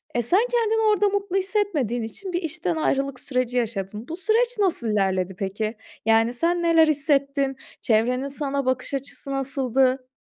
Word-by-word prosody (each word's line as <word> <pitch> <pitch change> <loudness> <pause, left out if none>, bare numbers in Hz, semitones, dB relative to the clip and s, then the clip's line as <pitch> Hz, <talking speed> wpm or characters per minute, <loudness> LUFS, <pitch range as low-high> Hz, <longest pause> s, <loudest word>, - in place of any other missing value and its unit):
eee, 240 - +2
sen 345 - +3
kendini 450 -2 +2
orada 415 0 +2
mutlu 400 -1 -1
hissetmediğin 375 - 0
için 360 - -7
bir 350 - 0
işten 290 - -2
ayrılık 270 - 0
süreci 250 -2 -1
yaşadın. 215 -1 -3
Bu 330 - -5
süreç 460 +5 +1
nasıl 360 - +1
ilerledi 190 -3 0
peki? 210 +3 -2 0.3
Yani, 225 +1 +3
sen 340 +7 +1
neler 330 -1 +5
hissettin? 275 -2 +1 0.2
Çevrenin 250 +4 +1
sana 280 -1 -2
bakış 260 +1 -1
açısı 275 0 -5
nasıldı? 265 -1 0
270 Hz, 155 wpm, -24 LUFS, 235-340 Hz, 0.3 s, neler